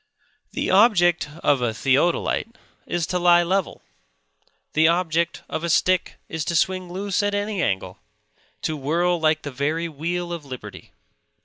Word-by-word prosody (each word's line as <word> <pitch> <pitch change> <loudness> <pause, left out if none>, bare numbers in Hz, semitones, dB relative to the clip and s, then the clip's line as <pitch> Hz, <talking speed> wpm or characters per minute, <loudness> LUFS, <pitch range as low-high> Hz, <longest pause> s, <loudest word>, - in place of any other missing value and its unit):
The - - -1
object 180 -6 +4
of 140 -3 +3
a 115 -2 -1
theodolite 165 - +1 0.3
is 175 -2 -1
to 180 +1 -2
lie 175 0 +5
level; 185 +1 -1 0.9
the 160 +1 +4
object 170 -1 0
of 160 - -4
a 170 - -1
stick 185 +3 +2
is 160 -1 -3
to 170 - -2
swing 185 +2 0
loose 195 +2 -1
at 205 0 0
any 205 -1 -2
angle; 95 - -2 0.6
to 155 - -1
whirl 170 +5 0
like 155 -1 +1
the 145 - -5
very 155 +6 -1
wheel 170 +3 -3
of 170 -3 -6
liberty. 130 -3 -10
170 Hz, 150 wpm, -23 LUFS, 155-180 Hz, 0.9 s, lie